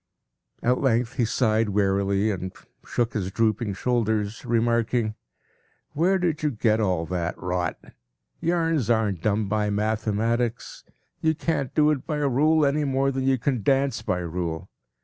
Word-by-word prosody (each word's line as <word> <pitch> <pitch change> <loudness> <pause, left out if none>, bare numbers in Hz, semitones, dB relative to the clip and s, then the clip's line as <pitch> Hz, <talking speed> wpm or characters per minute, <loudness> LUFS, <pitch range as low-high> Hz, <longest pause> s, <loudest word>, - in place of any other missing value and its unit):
At 125 +1 +2
length 120 -3 +1
he 120 - +3
sighed 110 -2 +1
wearily 100 +1 +1
and 95 -1 -4 0.3
shook 120 -1 -1
his 95 -4 -2
drooping 110 -2 0
shoulders, 110 -2 -1
remarking: 115 -1 +1 0.8
“Where 180 +6 +2
did 170 -4 -1
you 150 - +1
get 110 -3 +1
all 90 -6 0
that 90 +1 -3
rot? 90 -1 -2 0.6
Yarns 165 -7 0
aren’t 105 -7 +1
done 105 0 +1
by 105 +1 0
mathematics. 110 +3 -1 0.4
You 160 0 +1
can’t 145 -4 -2
do 150 0 +4
it 140 -4 -3
by 150 - -1
rule 150 +2 +3
any 145 +2 +1
more 135 0 +1
than 130 0 -2
you 135 -1 +3
can 125 -1 -1
dance 135 +3 +1
by 110 -4 -1
rule. 85 -1 -4
115 Hz, 150 wpm, -25 LUFS, 105-135 Hz, 0.8 s, do